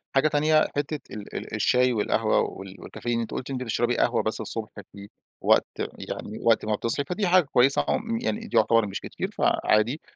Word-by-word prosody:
حاجة 135 +3 +4
تانية 155 +1 +3
حتّة 145 +1 -2
ال 105 -1 -9
ال - - -5
الشاي 125 0 +3
والقهوة 105 -3 +1
وال 95 0 -7
والكافيين 120 -1 -3
أنت 115 - -4
قلتِ 130 - -5
أنت 130 -1 -3
بتشربي 120 +1 0
قهوة 120 -1 +2
بس 110 +1 -2
الصبح 110 -1 -3 0.2
في 100 0 -11 0.3
وقت، - - +4 0.3
يعني 105 - -6
وقت 115 -2 +3
ما 105 0 +1
بتصحي، 115 +6 0
فدي 190 +1 -1
حاجة 180 0 +5
كويسة 135 +1 +3
عم 230 +1 -1
يعني 225 -1 -3
يعتبر 115 -1 +4
مش 100 - -5
كتير - - -5
فعادي، 110 +8 +1
120 Hz, 185 wpm, -25 LUFS, 110-150 Hz, 0.3 s, حاجة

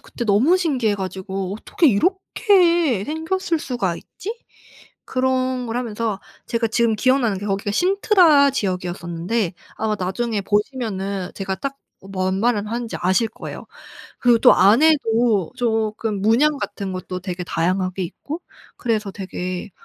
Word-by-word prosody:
그때 240 - -6
너무 235 - +4
신기해 260 - +1
가지고 190 0 -4
'어떻게 265 - 0
이렇게 345 - +2
생겼을 320 +2 -1
수가 215 - -2
있지?' 410 +5 -7 0.7
그런 255 -1 0
걸 230 +1 -3
하면서 225 -4 -2 0.3
제가 230 -1 0
지금 230 0 +2
기억나는 250 -4 +2
게 205 - -6
거기가 200 +1 -1
신트라 355 - +4
지역이었었는데 180 -2 -2 0.2
아마 215 -1 -1
나중에 205 +4 -1
보시면은 200 -3 -2
제가 190 -1 -3
딱 275 0 -4 0.3
뭔 190 0 -1
말을 215 -3 +1
하는지 235 +1 -4
아실 190 +6 +2
거예요. - - -9 0.5
그리고 240 -1 +4
또 - - +7
안에도 225 - +4
쪼끔 220 -3 -1
문양 275 +7 +3
같은 195 -6 -4
것도 185 0 -5
되게 180 -1 -5
다양하게 185 +3 -1
있고 300 - -7 0.3
그래서 220 -4 -1
되게 185 0 -5
220 Hz, 310 characters per minute, -21 LUFS, 190-260 Hz, 0.7 s, 또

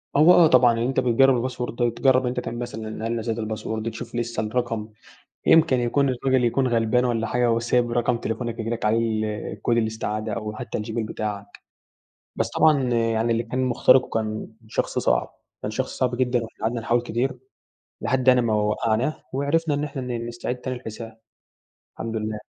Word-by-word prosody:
هو 155 +5 +7
آه 170 -2 +7
طبعًا، 125 -4 +5
إن - - -3
أنت 125 +3 0
بتجرّب 130 +1 +4
الباسورد 125 0 -4
وتجرب 130 +2 +3
أنت 125 0 -1
تعمل 120 -1 -5
مثلًا 110 -2 -5
هل 115 - -1
نسيت 115 0 -2
الباسورد، 110 0 -3
تشوف 115 +1 -8
لسه 120 -2 -2
الرقم، 115 -1 -2 0.6
يمكن 160 -6 +5
يكون 135 +4 +1
الراجل 130 0 +1
يكون 130 +3 +2
غلبان 120 +1 +2
والّا 115 -2 0
حاجة 120 +2 +1
وسايب 120 +1 +1
رقم 120 0 +1
تليفونك 115 0 -4
ييجي 115 0 -3
لك 115 -1 -3
عليه 110 +2 +3 0.5
ال - - -10
كود 120 - +2
الاستعادة، 110 -1 -2
أو 105 0 -4
حتى - - -4
الGmail 110 +1 -3
بتاعك، 105 -2 -4 0.9
بس - - -1
طبعًا 150 -3 +4
يعني 115 0 +1
اللي 115 0 0
كان 125 +3 -2
مُخترقه 130 +1 +4
كان 110 -1 -3 0.2
شخص - - -1
صعب، - - +1 0.3
كان - - -3
شخص - - -3
صعب 125 -1 0
جدًا، 125 0 +1
وإحنا 115 - -11
قعدنا 115 +2 -1
نحاول 120 +1 +1
كتير 120 +2 -2 0.6
لحد 130 -1 0
يعني 125 -1 +6
ما 115 -2 0
وقعناه 110 +6 0
وعرفنا 145 +3 +1
إن 145 - -2
إحنا 140 -2 -4
ن 120 -2 -4
نستعيد 120 +1 -4
تاني 130 +1 -4
الحساب، 115 -2 -8 0.8
الحمد 115 0 -5
لله. 110 0 -3
120 Hz, 180 wpm, -24 LUFS, 110-125 Hz, 0.9 s, هو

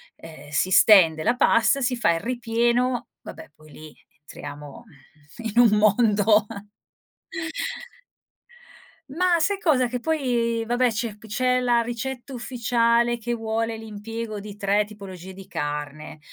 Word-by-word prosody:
Ehm, 155 -3 -13
si 185 +5 0
stende 165 -7 +6
la 240 - +2
pasta, 250 +3 +3
si 250 0 0
fa 235 -8 +2
il 165 - -2
ripieno 240 +1 0 0.2
vabbè - - -11
poi 155 0 -19
lì 155 +1 -13 0.2
entriamo, 145 -1 -10 0.6
mhmm, - - -2
in 235 +4 +1
un - - +3
mondo. 210 0 +3 2.6
Mah, 345 +3 +1
sai 395 +5 +1
cosa, 270 -9 +2
che 250 0 -3
poi 240 -6 -1
vabbè 245 +1 +2
c'è 220 -1 -4
p 215 - -16
c'è 250 +4 +1
la 240 -1 +2
ricetta 245 +3 -5
ufficiale 235 -1 +1
che 240 +1 -4
vuole 225 0 -2
l'impiego 220 0 -7
di 205 0 -9
3 205 0 +1
tipologie 190 -3 -10
di 190 0 -12
carne: 150 -2 -5
225 Hz, 135 wpm, -24 LUFS, 200-245 Hz, 2.6 s, stende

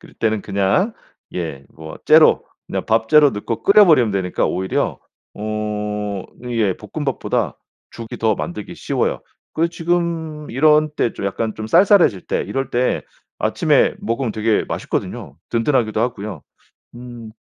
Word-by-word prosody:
그때는 110 -2 -2
그냥 100 - +1 0.4
예 80 -6 -4
뭐 80 0 -10
째로 - - +6 0.2
그냥 - - -3
밥째로 115 +7 +4
넣고 110 +2 -4
끓여 205 +1 +7
버리면 130 - +4
되니까 95 -2 -1
오히려 95 +1 -1 0.4
어 105 -2 -3 0.2
이게 115 -6 0
볶음밥보다 125 - -2 0.3
죽이 115 -1 -8
더 110 -2 +2
만들기 85 +6 -6
쉬워요. - - -2 0.3
그 165 +2 +1
지금 165 -3 -2
이런 150 +4 +4
때 120 - +1
좀 - - -7
약간 110 +3 -2
좀 110 - -6
쌀쌀해질 170 - +4
때 - - -1
이럴 135 -1 -3
때 125 +1 0 0.4
아침에 - - +2
먹으면 115 0 -2
되게 110 0 +1
맛있거든요. - - -4
든든하기도 115 -3 +1
하고요. 105 - -3 0.5
음. 120 -2 -9
115 Hz, 290 characters per minute, -20 LUFS, 105-145 Hz, 0.5 s, 끓여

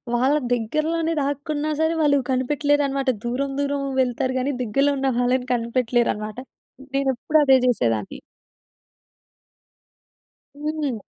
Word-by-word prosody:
వాళ్ళ 260 +4 +3 0.2
దగ్గరలోనే 310 +8 -1
దాక్కున్నా 290 +2 -2
సరే! 320 +1 +2
వాళ్ళు 285 -2 +4
కనిపెట్టలేరన్నమాట. 275 0 +1 0.2
దూరం 270 +3 -2
దూరం 280 0 -1 0.2
వెళ్తారు 255 +1 -1
గాని 275 +2 -1
దగ్గరలో 275 +6 +1
ఉన్న 270 0 +1
వాళ్ళని 250 +1 +1
కనిపెట్టలేరన్నమాట. 235 -2 0 0.6
నేనెప్పుడు 275 +2 +1
అదే 265 -1 +6
చేసేదాన్ని. 115 - 0 2.4
హ్మ్. 295 -7 -2
270 Hz, 95 wpm, -23 LUFS, 245-290 Hz, 2.4 s, అదే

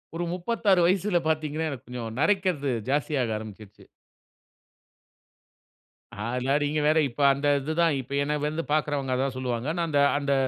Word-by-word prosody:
ஒரு 170 - -2
36 195 +1 +1
வயசுல 190 0 +2
பார்த்தீங்கன்னா, 155 0 -1
எனக்கு 130 -5 -9
கொஞ்சம் 115 -2 -6
நரைக்கிறது, 175 -6 +1 0.2
ஜாஸ்தியாக 135 -5 0
ஆரம்பிச்சுருச்சு. 105 -1 -11 2.4
அதெல்லாம் 125 +5 0
நீங்க 150 +1 0
வேற, 155 +1 +3
இப்ப 125 +4 -6
அந்த 140 +2 -2
இதுதான். 160 +3 +1
இப்ப 135 +2 -6
என்னை 150 +1 -1
வந்து 155 +2 -3
பார்க்குறவங்க, 145 -3 0
அதான் 130 0 -1
சொல்லுவாங்க. 125 -1 -3
நான் 170 -1 0
அந்த 145 -2 +2 0.2
அந்த 140 -1 0
145 Hz, 135 wpm, -26 LUFS, 130-160 Hz, 2.4 s, வேற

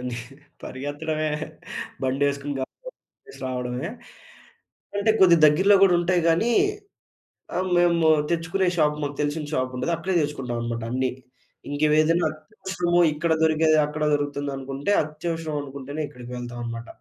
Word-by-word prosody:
అని 125 -1 -4 0.5
పరిగెత్తడమే! 155 +3 -3 0.7
బండేసుకొని 140 +2 0
గబ 130 - -2 0.6
గబ - - -12
రావడమే. 125 +1 -3 1.1
అంటే 205 +2 +2
కొద్దిగా 170 -3 +7
దగ్గరలో 190 +7 +5
కూడా 180 - +4
ఉంటాయి. 175 0 +2
కానీ 170 +9 +3 1.1
ఆహ్, 185 0 -1
మేము 170 -2 +3 0.2
తెచ్చుకునే 170 +3 0
షాప్ 150 -2 +2
మాకు 145 0 -3
తెలిసిన 150 +1 -1
షాపుంటది. 130 +4 -1
అక్కడే 180 +3 -2
తెచ్చుకుంటామన్నమాట 120 -5 -3
అన్నీ. 130 0 0 0.6
ఇంక 145 +1 -4 0.2
ఏదైనా 165 +2 +2
అత్యవసరము 175 +1 -2
ఇక్కడ 160 +2 -1
దొరికేది 155 0 +4
అక్కడ 150 +1 -4
దొరుకుతుంది 145 -1 -1
అనుకుంటే, 135 +7 -3
అత్యవసరం 160 +1 -4
అనుకుంటేనే 140 +2 -6
ఇక్కడికి 125 0 -11
వెళ్తామన్నమాట. 120 -1 -6
150 Hz, 120 wpm, -24 LUFS, 130-170 Hz, 1.1 s, కొద్దిగా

